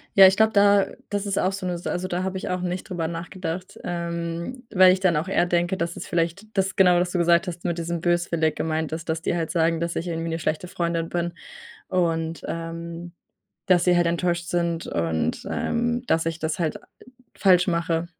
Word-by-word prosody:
Ja, 195 -1 +10
ich 190 - +4
glaube 220 0 +4
da 200 -1 +5 0.2
das 205 0 -2
ist 200 -1 -2
auch 185 - +2
so 195 -1 -5
'ne 175 -1 -1
Sa 170 - -4
also, 185 +1 -2
da 180 0 -2
habe 190 0 -2
ich - - -5
auch 180 0 -1
nicht 180 +2 -4
drüber 170 -3 -2
nachgedacht. 175 +1 -5
Ähm, 170 +7 -4
weil 185 -1 +7
ich 185 - +1
dann 185 -4 +2
auch 160 +5 -1
eher 185 -2 +2
denke, 175 +1 0
dass 170 +1 -2
es - - -7
vielleicht 170 +4 -1
das 190 0 +1
genau, 180 -2 +5
was 180 0 0
du 180 - -1
gesagt 170 +2 +3
hast, 175 +1 -6
mit 170 -1 -1
diesem 170 0 -3
böswillig 175 -3 +1
gemeint 160 -1 -2
ist, 160 0 -5
dass 160 0 -1
die - - -1
halt 165 -2 -2
sagen, 165 -1 +2
dass 170 0 -2
ich 170 - -3
„irgendwie 165 0 -3
'ne 165 +1 -2
schlechte 155 +3 -2
Freundin 170 -2 -2
bin“. 175 0 -2 0.6
Und, 165 -2 0
ähm, 165 +1 -6 0.5
dass 180 -2 +4
sie 180 -1 +4
halt 175 -1 +3
enttäuscht 170 0 0
sind. 170 -1 -1
Und, 80 -1 -1
ähm, 240 +1 -1
dass 165 0 +1
ich 165 -1 -2
das 160 0 -2
halt 160 -3 -1 0.6
falsch 180 -2 +4
mache. 170 0 0
170 Hz, 215 wpm, -24 LUFS, 165-185 Hz, 0.6 s, Ja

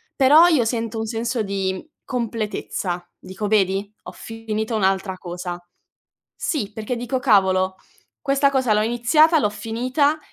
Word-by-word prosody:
però 295 +5 +7
io 305 -9 +3
sento 230 -1 -2
un 220 - -2
senso 230 +1 -2
di 195 0 -3 0.2
completezza. 210 -7 -3
Dico: 195 +3 -5
"Vedi? 200 0 +1
Ho - - -8
finito 225 0 -4
un'altra 190 -2 0
cosa". 175 0 -6 0.8
Sì, 215 - -3
perché 220 +3 -4
dico: 245 +2 -2
"Cavolo, 190 -6 +3 0.5
questa 275 0 +2
cosa 260 -5 +1
l'ho 210 0 +3
iniziata, 250 +9 +4
l'ho 210 -8 +1
finita 255 +8 0
220 Hz, 135 wpm, -22 LUFS, 195-250 Hz, 0.8 s, però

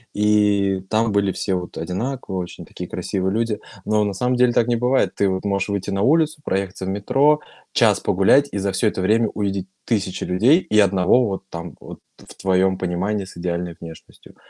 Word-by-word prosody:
и 105 -2 +2
там 110 0 +1
были 100 -1 +1
все 95 - -2
вот 90 -1 -4
одинаковые, 95 +4 -4
очень 90 - -7
такие - - -8
красивые 95 0 -2
люди. 110 -1 -1 0.3
Но 105 0 +2
на 100 -1 -1
самом 125 +5 0
деле 125 0 +4
так 115 - +3
не 120 - +2
бывает. 125 +3 +1
Ты 100 -1 +1
вот 95 +2 -3
можешь 100 0 -1
выйти 100 0 -3
на 95 - -1
улицу, 155 +4 +2
проехаться 95 0 -3
в 95 - -3
метро, 140 +10 +2 0.3
час - - +3
погулять, 115 +10 +3
и - - -3
за 100 0 -1
всё 95 +4 +1
это 95 - -1
время 110 +4 +3
увидеть 100 -2 -3 0.2
тысячи 100 -5 -1
людей 115 - +4
и 105 - +1
1 100 +4 +4
вот 95 -1 -4
там 85 -5 -7
вот - - -11 0.2
в - - -15
твоем 95 0 +1
понимании 95 +3 -2
с 95 - -13
идеальной 85 -1 -3
внешностью. 80 -1 -13
100 Hz, 195 wpm, -21 LUFS, 95-110 Hz, 0.3 s, деле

